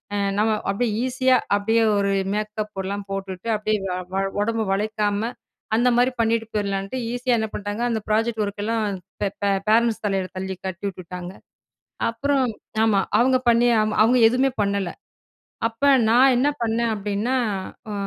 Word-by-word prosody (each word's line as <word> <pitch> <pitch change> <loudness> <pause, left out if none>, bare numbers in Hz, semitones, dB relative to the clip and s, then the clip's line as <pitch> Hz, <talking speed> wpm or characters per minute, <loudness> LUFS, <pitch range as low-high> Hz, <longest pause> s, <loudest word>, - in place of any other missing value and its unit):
அ - - 0 0.2
நம்ம 215 +1 +2 0.2
அப்பிடியே 220 +4 0
ஈஸியா 260 0 +2 0.2
அப்பிடியே 225 +3 +2
ஒரு 200 0 +1 0.2
மேக்கப் 215 0 -4
எல்லாம் 200 +1 -4
போட்டுட்டு 195 0 -5
அப்பிடியே 215 0 0
வ 185 - -2 0.2
வ - - -1 0.2
உடம்ப 225 +2 0
வளைக்காம, 210 +1 0 0.5
அந்தமாரி 245 +2 +3
பண்ணிட்டு 225 0 +1
போயிரலான்ட்டு, 200 +2 -2 0.2
ஈஸியா 245 0 +1
என்ன 220 - -1
பண்ட்டாங்க. 205 +2 -4
அந்த 225 -2 0
ப்ராஜெக்ட் 225 +1 +1
ஒர்க்லாம் 205 0 -2 0.2
பே 205 - +2 0.2
பே 200 - +3 0.2
ஃபேரண்ட்ஸ் 230 +1 +3
தலையில 195 -2 -1
தள்ளி 190 0 -4
கட்டி 190 +1 -6
உட்டுட்டாங்க 180 0 -8 0.8
அப்புறம், 270 +3 +1 0.4
ஆமா. 210 -3 +3 0.2
அவுங்க 255 +2 +4
பண்ணி 235 +1 +5
ஆமா 215 0 -1
அவுங்க 250 +3 +4
எதுவுமே 255 +3 +2
பண்ணல. 200 -2 -1 0.8
அப்ப 230 +4 -13 0.3
நான் 255 +3 +6
என்ன 260 +4 +2 0.2
பண்ணேன் 230 0 0
அப்பிடின்னா 205 +5 -1 0.6
அ - - -3
215 Hz, 145 wpm, -23 LUFS, 200-235 Hz, 0.8 s, நான்